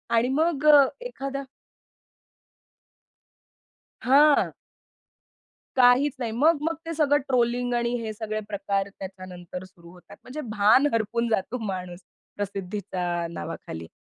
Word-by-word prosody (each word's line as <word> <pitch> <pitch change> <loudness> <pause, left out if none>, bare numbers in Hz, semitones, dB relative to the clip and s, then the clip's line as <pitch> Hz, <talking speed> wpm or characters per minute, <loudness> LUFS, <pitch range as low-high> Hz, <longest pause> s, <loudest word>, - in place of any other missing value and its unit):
आणि 240 +3 +3
मग 315 -3 +1
अ, 285 - +9 0.2
एखादा 275 - -5 2.6
हां. 290 +3 +5 1.3
काहीच 255 +3 +5
नाही. 230 -3 -2
मग-मग 310 +5 +2
ते 330 - -4
सगळं 290 -2 +3
ट्रोलिंग 245 -1 +1
आणि 235 0 0
हे 220 -1 -4
सगळे 215 0 -4
प्रकार 200 -1 -2
त्याच्यानंतर 185 -1 -8
सुरु 175 -2 -16
होतात. 180 +3 -15
म्हणजे 300 +5 -7 0.2
भान 220 +8 +5
हरपून 230 +1 0
जातो 220 +3 -1
माणूस 180 -2 -5 0.4
प्रसिद्धीच्या 185 -3 -3
नावाखाली. 85 - -7
230 Hz, 105 wpm, -25 LUFS, 190-275 Hz, 2.6 s, अ